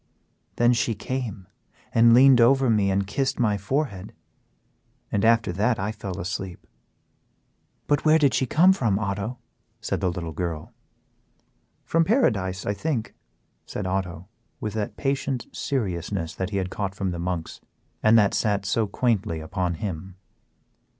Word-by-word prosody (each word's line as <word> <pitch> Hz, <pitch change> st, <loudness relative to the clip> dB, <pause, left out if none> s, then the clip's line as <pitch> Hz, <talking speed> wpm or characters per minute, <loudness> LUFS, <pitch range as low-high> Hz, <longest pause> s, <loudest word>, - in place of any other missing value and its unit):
Then 120 Hz, +1 st, +4 dB
she 115 Hz, -1 st, 0 dB
came 105 Hz, -5 st, -5 dB, 0.5 s
and 115 Hz, 0 st, +6 dB
leaned 130 Hz, -1 st, +7 dB
over 130 Hz, +1 st, +4 dB
me 105 Hz, -3 st, +2 dB
and 95 Hz, 0 st, +1 dB
kissed 135 Hz, +7 st, -1 dB
my 110 Hz, -4 st, +2 dB
forehead, 100 Hz, -2 st, -3 dB, 1.0 s
and 100 Hz, -, 0 dB
after 115 Hz, -3 st, +3 dB
that 110 Hz, +6 st, +1 dB
I 100 Hz, +2 st, -2 dB
fell 100 Hz, -4 st, -6 dB
asleep." 95 Hz, -1 st, -5 dB, 1.2 s
"But 145 Hz, -, +1 dB
where 155 Hz, 0 st, +5 dB
did 145 Hz, -4 st, +3 dB
she 130 Hz, -, +1 dB
come 180 Hz, +9 st, +5 dB
from, 115 Hz, -, +1 dB
Otto?" 105 Hz, +3 st, -3 dB, 0.4 s
said -, -, -3 dB
the 95 Hz, -, +1 dB
little 85 Hz, -2 st, -4 dB
girl. 80 Hz, -1 st, -4 dB, 1.1 s
"From 165 Hz, 0 st, +2 dB
paradise, 105 Hz, -, +1 dB
I 100 Hz, -, 0 dB
think," 125 Hz, -1 st, -3 dB, 0.5 s
said 100 Hz, -, -4 dB
Otto, 90 Hz, -2 st, -3 dB, 0.3 s
with 105 Hz, -, -4 dB
that 110 Hz, -2 st, -3 dB
patient 135 Hz, -2 st, -1 dB
seriousness 95 Hz, -, -3 dB
that 95 Hz, 0 st, -3 dB
he 100 Hz, -, -2 dB
had 95 Hz, -1 st, -2 dB
caught 95 Hz, -2 st, -3 dB
from 95 Hz, -2 st, -2 dB
the 85 Hz, -, -5 dB
monks, 85 Hz, -2 st, -4 dB, 0.4 s
and 110 Hz, +1 st, +5 dB
that 105 Hz, -3 st, +4 dB
sat 100 Hz, -3 st, 0 dB
so 110 Hz, +2 st, +1 dB
quaintly 100 Hz, -7 st, 0 dB
upon 90 Hz, +2 st, -2 dB
him. 95 Hz, -2 st, -5 dB
105 Hz, 150 wpm, -25 LUFS, 95-120 Hz, 1.2 s, leaned